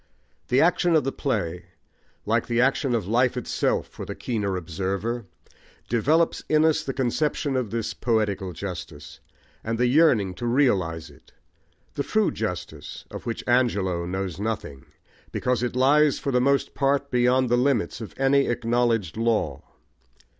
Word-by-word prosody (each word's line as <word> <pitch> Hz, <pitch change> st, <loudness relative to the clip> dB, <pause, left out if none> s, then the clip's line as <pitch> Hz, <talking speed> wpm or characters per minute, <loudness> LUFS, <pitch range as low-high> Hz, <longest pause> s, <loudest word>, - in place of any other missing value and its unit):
The 125 Hz, +2 st, +3 dB
action 175 Hz, 0 st, +3 dB
of 155 Hz, -, +4 dB
the 135 Hz, -, -1 dB
play, 90 Hz, -, -2 dB, 0.6 s
like 115 Hz, +2 st, +1 dB
the 120 Hz, 0 st, 0 dB
action 135 Hz, 0 st, +2 dB
of 105 Hz, -6 st, -2 dB
life 125 Hz, +3 st, +2 dB
itself 125 Hz, -, 0 dB
for -, -, -9 dB
the -, -, -6 dB
keener 105 Hz, -6 st, -2 dB
observer, 95 Hz, +6 st, -3 dB, 0.6 s
develops 150 Hz, +9 st, +2 dB
in 155 Hz, 0 st, +4 dB
us 160 Hz, -1 st, +2 dB
the 135 Hz, -, -3 dB
conception 135 Hz, +2 st, -1 dB
of 125 Hz, -4 st, -1 dB
this 115 Hz, 0 st, -3 dB
poetical 105 Hz, -5 st, -1 dB
justice, 85 Hz, -4 st, -8 dB, 0.4 s
and 115 Hz, +1 st, -2 dB
the 125 Hz, -, +2 dB
yearning 125 Hz, -, +3 dB
to 110 Hz, +7 st, -5 dB
realise 95 Hz, -, +1 dB
it, 70 Hz, -, -21 dB, 0.6 s
the -, -, -2 dB
true 215 Hz, +7 st, +1 dB
justice 100 Hz, -6 st, -5 dB
of -, -, -8 dB
which 115 Hz, -, -3 dB
Angelo 100 Hz, -9 st, +1 dB
knows 95 Hz, -1 st, -4 dB
nothing, 105 Hz, -11 st, -4 dB, 0.4 s
because 125 Hz, -2 st, 0 dB
it 125 Hz, 0 st, -2 dB
lies 145 Hz, +3 st, +4 dB
for 140 Hz, -, -3 dB
the 125 Hz, -1 st, +2 dB
most 140 Hz, +2 st, +1 dB
part 140 Hz, 0 st, 0 dB
beyond 125 Hz, +1 st, +3 dB
the 120 Hz, -, +4 dB
limits 125 Hz, -2 st, 0 dB
of 110 Hz, -, -8 dB
any 135 Hz, +1 st, +3 dB
acknowledged 115 Hz, -6 st, 0 dB
law. 110 Hz, -, 0 dB
120 Hz, 155 wpm, -25 LUFS, 100-135 Hz, 0.6 s, of